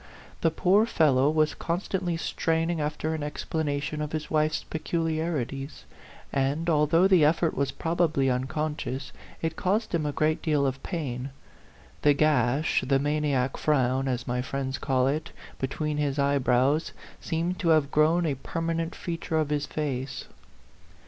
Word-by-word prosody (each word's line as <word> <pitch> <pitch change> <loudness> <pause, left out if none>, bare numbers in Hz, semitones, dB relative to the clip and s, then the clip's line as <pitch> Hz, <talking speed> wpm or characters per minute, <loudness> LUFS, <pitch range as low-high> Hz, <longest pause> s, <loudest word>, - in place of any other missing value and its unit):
The 165 - +4
poor 195 +7 +3
fellow 140 - +3
was 155 -1 +2
constantly 175 0 -2
straining 165 0 0
after 150 +1 -2
an 160 - -3
explanation 150 0 -2
of 150 0 -4
his 155 -1 -4
wife's 155 0 +1
peculiarities; 155 - -3 0.5
and, 140 +5 0
although 155 +4 +4
the 185 -5 +5
effort 160 +2 +2
was 140 -1 0
probably 160 -4 +1
un 125 0 +1
conscious, 150 -2 -3 0.3
it 160 0 -1
caused 205 +6 0
him 155 -3 +1
a - - 0
great 155 +2 0
deal 150 -4 +1
of 135 0 -2
pain. 135 -7 -4 0.7
The 145 -1 +5
gash 145 -1 +2
the 135 0 +4
maniac 140 -2 0
frown, 135 -2 +1
as 125 -1 -2
my 125 0 0
friends 130 0 -3
call 130 -3 +1
it 150 +4 -1 0.3
between 150 +3 -2
his 145 -1 0
eyebrows 140 +1 +2 0.3
seemed 170 +3 -2
to 170 - +1
have 155 -3 +3
grown 160 +3 +3
a 150 - +1
permanent 165 +4 -3
feature 165 -2 -3
of 155 -2 +1
his 145 -1 0
face. 135 -4 -3
150 Hz, 150 wpm, -27 LUFS, 135-160 Hz, 0.7 s, the